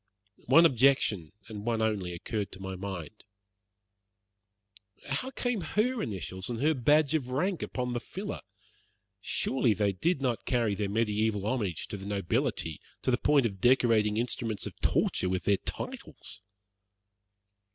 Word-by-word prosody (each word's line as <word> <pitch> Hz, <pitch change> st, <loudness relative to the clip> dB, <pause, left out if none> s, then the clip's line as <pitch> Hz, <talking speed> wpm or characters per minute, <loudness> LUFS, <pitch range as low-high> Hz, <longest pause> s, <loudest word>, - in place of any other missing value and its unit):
One 165 Hz, +1 st, +7 dB
objection, 125 Hz, -, +3 dB, 0.2 s
and 105 Hz, -2 st, -7 dB
one 115 Hz, 0 st, 0 dB
only, 105 Hz, -5 st, 0 dB
occurred 105 Hz, +4 st, -3 dB
to 95 Hz, -, -10 dB
my 95 Hz, 0 st, -5 dB
mind. 95 Hz, 0 st, -6 dB, 1.9 s
"How 145 Hz, -, -1 dB
came 245 Hz, -5 st, -1 dB
her 220 Hz, +8 st, 0 dB
initials 95 Hz, -1 st, -5 dB
and 120 Hz, -2 st, -3 dB
her 155 Hz, +4 st, +3 dB
badge 145 Hz, +3 st, +3 dB
of 140 Hz, -6 st, 0 dB
rank 170 Hz, +7 st, 0 dB
upon 125 Hz, -1 st, -3 dB
the 120 Hz, -, -1 dB
filler? 195 Hz, -, -6 dB, 0.8 s
Surely 125 Hz, -2 st, +1 dB
they 105 Hz, -1 st, +2 dB
did 155 Hz, -, 0 dB
not 125 Hz, -4 st, -1 dB
carry 120 Hz, -5 st, +2 dB
their 100 Hz, 0 st, -2 dB
mediaeval 105 Hz, -1 st, 0 dB
homage 105 Hz, -8 st, -1 dB
to 105 Hz, -, -4 dB
the 95 Hz, 0 st, -8 dB
nobility 95 Hz, -5 st, -1 dB, 0.2 s
to -, -, +2 dB
the 120 Hz, -, +3 dB
point 145 Hz, -4 st, +4 dB
of 95 Hz, -5 st, -3 dB
decorating 115 Hz, -4 st, +4 dB
instruments 115 Hz, -3 st, -1 dB
of -, -, -6 dB
torture 90 Hz, -, +1 dB
with 95 Hz, 0 st, -1 dB
their 100 Hz, -1 st, +3 dB
titles?" -, -, -6 dB
115 Hz, 145 wpm, -30 LUFS, 100-135 Hz, 1.9 s, One